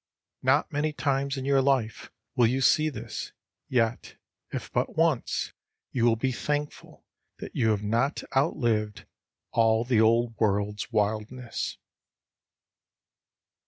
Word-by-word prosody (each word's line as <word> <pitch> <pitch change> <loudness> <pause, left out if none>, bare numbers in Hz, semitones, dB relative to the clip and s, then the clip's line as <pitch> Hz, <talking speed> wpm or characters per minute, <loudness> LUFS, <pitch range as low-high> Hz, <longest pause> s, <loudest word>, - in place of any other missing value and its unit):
Not 130 +3 +2
many 150 +1 0
times 140 -1 -1
in 130 - -4
your 140 -1 +4
life 130 -5 0 0.3
will 120 -2 +5
you 130 +3 0
see 155 +3 +4
this, 145 - -6 0.4
yet, 120 -2 0 0.4
if - - -5
but - - -1
once, - - +1 0.4
you 120 -3 +1
will 115 -1 +4
be 130 +4 -1
thankful 145 +4 -4 0.3
that - - -9
you 110 - +2
have 105 -1 +1
not 115 +7 0
outlived 115 -8 0 0.5
all 115 0 +3
the 120 -3 +3
old 115 +1 +3
world's 105 +1 0
wildness. 110 +3 -2
120 Hz, 125 wpm, -27 LUFS, 110-135 Hz, 0.5 s, will